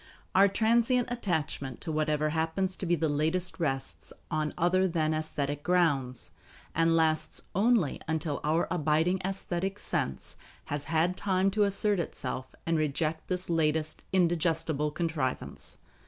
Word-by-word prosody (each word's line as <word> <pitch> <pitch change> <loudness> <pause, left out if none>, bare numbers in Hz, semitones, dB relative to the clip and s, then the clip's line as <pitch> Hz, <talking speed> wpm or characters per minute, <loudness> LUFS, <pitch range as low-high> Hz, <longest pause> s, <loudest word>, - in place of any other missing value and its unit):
Our 195 +2 +6
transient 235 +4 +2
attachment 160 - -2
to 165 - -3
whatever 155 0 +1
happens 165 +4 -1
to 185 - -5
be 175 - +3
the 160 0 0
latest 160 +5 +1
rests 135 - -1 0.2
on 155 -1 0
other 185 +2 +3
than 160 -3 0
aesthetic 145 -2 -2
grounds, 145 -8 +1 0.4
and 165 0 +3
lasts 155 -1 +1
only 210 - +2
until 155 -2 -1
our 160 +3 +1
abiding 165 +2 +1
aesthetic 195 0 -2
sense 65 - -3 0.3
has 145 0 -3
had 165 +3 +1
time 190 0 +1
to 210 +1 +3
assert 200 0 +1
itself 130 -5 -4
and 165 -1 +1
reject 155 +1 -1
this 180 0 0
latest 155 -2 +1
indigestible 165 -4 +1
contrivance. 155 -5 -3
165 Hz, 135 wpm, -29 LUFS, 150-185 Hz, 0.4 s, Our